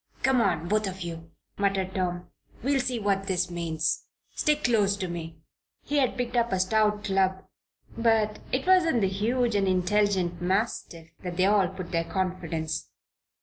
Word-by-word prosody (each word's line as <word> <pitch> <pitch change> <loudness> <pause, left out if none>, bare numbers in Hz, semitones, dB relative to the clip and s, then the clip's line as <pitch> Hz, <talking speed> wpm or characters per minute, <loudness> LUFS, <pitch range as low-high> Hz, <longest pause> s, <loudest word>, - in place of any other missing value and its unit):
"Come 265 -2 +4
on 170 -5 +1
both 210 +2 +1
of 190 0 -6
you!" 165 -1 -6 0.3
muttered 195 -2 0
Tom. 180 -2 -2 0.4
"We'll 275 +1 +2
see 250 -1 -1
what 200 -2 0
this 180 -1 0
means. 165 -2 -1 0.3
Stick 300 0 +1
close 205 -4 +3
to 190 -2 -3
me." 165 -2 -6 0.5
He 290 - -1
had 260 -2 +2
picked 245 0 -2
up 235 -2 +2
a 190 - +1
stout 210 +2 +2
club; 190 -2 +1 0.5
but 225 -2 +2
it 260 +1 0
was 370 -1 +6
in 320 -9 +1
the 195 - +3
huge 230 +5 0
and 200 -1 +2
intelligent 185 -1 +1
mastiff 180 -4 -2
that 175 -1 -5
they 185 - +4
all 200 -2 +4
put 185 -2 -8
their 165 -1 +1
confidence. 165 -5 -3
195 Hz, 170 wpm, -27 LUFS, 180-220 Hz, 0.5 s, was